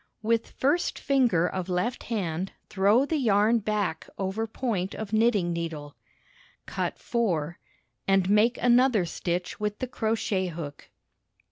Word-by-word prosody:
With 230 +1 +1
first 290 +6 0
finger 245 -12 +2
of 185 -1 -4
left 185 +8 -1
hand 185 -5 -2 0.2
throw 205 +7 +3
the 315 +2 -1
yarn 220 -1 +3
back 210 -6 -2
over 195 +4 -2
point 215 -5 -2
of 220 -1 -6
knitting 215 -6 +2
needle, 160 -4 -5 0.7
Cut - - -3
4 175 -9 -1 0.5
and 195 -1 +3
make 210 +5 +3
another 245 -4 +4
stitch 175 +1 -3
with 210 0 -2
the - - -2
crochet 220 -5 -1
hook. 155 -4 -7
205 Hz, 130 wpm, -27 LUFS, 180-230 Hz, 0.7 s, another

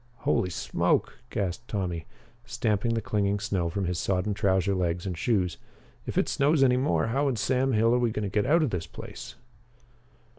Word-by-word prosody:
"Holy 90 - +1
smoke!" 85 - 0
gasped 100 +4 -3
Tommy, 90 -5 -3 0.4
stamping 115 -2 0
the 115 - -1
clinging 100 -1 0
snow 90 -4 -1
from 95 +3 -2
his 90 -1 -1
sodden 95 +2 0
trouser 95 -1 +1
legs 90 -1 -1
and 90 -2 -3
shoes, 90 -1 0 0.5
"if - - -4
it - - +3
snows 140 +1 +3
any 125 -2 +5
more, 130 +4 +1
how 140 +5 +1
in 135 - +1
Sam 130 +5 +1
Hill 115 +2 +3
are 125 - +3
we 120 -1 +2
going 105 -1 -3
to - - -1
get 100 +1 0
out 160 +3 +4
of 140 - 0
this 85 -3 -3
place?" - - -9
105 Hz, 190 wpm, -27 LUFS, 90-120 Hz, 0.5 s, any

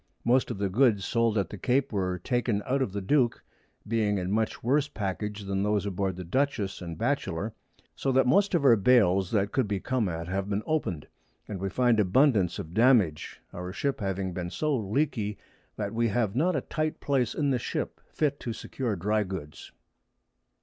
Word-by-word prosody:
Most 125 +2 +3
of - - -4
the 100 0 0
Goods 105 -1 +3
sold 115 -2 +1
at 100 -5 -1
the 105 - -7
Cape 130 +4 +1
were 90 -2 0
taken 120 +1 -1
out 135 +1 0
of 130 - 0
the 100 0 -4
Duke, 125 +3 +2 0.4
being 105 -2 +1
in 90 0 -2
much 110 +1 -1
worse 140 +4 +2
Package 105 0 -4
than 95 0 -2
those 105 0 +1
aboard 95 -1 -1
the 90 - -6
Dutchess 105 -1 -1
and 85 -2 -6
Batchelor; 110 -5 -1 0.4
so 135 - -1
that 130 +1 +4
most 190 +10 +3
of 150 -5 +1
our 120 -4 +8
Bales 100 -4 +4
that 100 -2 +1
could 130 -5 +1
be 100 -1 -1
come 120 -2 0
at, 80 0 -4
have 95 +2 -2
been 105 +1 -1
open'd, 120 - -1 0.4
and 100 -3 -5
we 95 +1 -2
find 120 0 +2
abundance 105 - +3
of 80 - -7
Damage, 110 - +3
our 90 +1 -5
Ship 140 +7 -2
having 95 -2 -2
been 85 0 -4
so 150 - 0
long 105 -6 -4
leaky, 115 -7 0 0.4
that 100 -1 -3
we 115 +1 +1
have 110 -1 0
not 170 +6 +2
a 135 - 0
tight 155 +2 -2
Place 130 -5 0
in 145 -2 +1
the 125 - +1
Ship - - -4
fit 145 -2 0
to 115 - -4
secure 115 0 -3
dry 105 +4 +1
Goods. 90 -7 -7
105 Hz, 200 wpm, -28 LUFS, 95-130 Hz, 0.4 s, our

